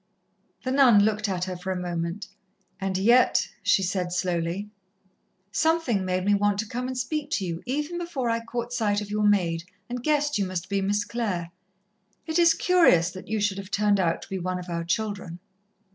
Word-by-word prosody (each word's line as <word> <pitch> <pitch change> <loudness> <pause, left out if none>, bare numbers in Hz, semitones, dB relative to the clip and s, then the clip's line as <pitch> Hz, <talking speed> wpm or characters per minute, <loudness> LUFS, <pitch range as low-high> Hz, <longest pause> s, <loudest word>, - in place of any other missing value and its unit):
The 255 - -2
nun 250 -7 +6
looked 215 -1 0
at 180 -2 -1
her 185 0 -3
for 180 +2 -5
a - - -1
moment. 175 +2 -3 0.5
"And 190 -1 -1
yet," 235 +6 +4
she 200 0 +3
said 180 -1 -1
slowly, 180 +2 -2 0.8
"something 305 - +1
made 185 0 -1
me 205 - +4
want 205 0 +2
to 215 +1 -2
come 245 +3 -3
and 260 0 -4
speak 295 +4 -2
to 195 - 0
you, 170 -1 -4
even 300 +6 -2
before 335 -8 -3
I 230 0 +1
caught 235 +1 -5
sight 210 -4 +1
of 205 0 -7
your 210 0 +3
maid, 170 -5 +1 0.3
and 245 0 -4
guessed 295 -1 +1
you 195 - 0
must 185 -1 -4
be 200 -1 0
Miss 205 +1 0
Clare. 200 -8 -3 0.7
It 320 +2 0
is 335 -1 +6
curious 255 - +4
that 185 +1 -10
you 220 +1 -1
should 200 -1 0
have 195 0 -8
turned 205 -1 +2
out 170 -3 0
to - - -13
be 190 - -3
one 185 +1 -2
of 180 0 -8
our 170 -1 -2
children." 190 -1 -3
205 Hz, 200 wpm, -26 LUFS, 185-240 Hz, 0.8 s, nun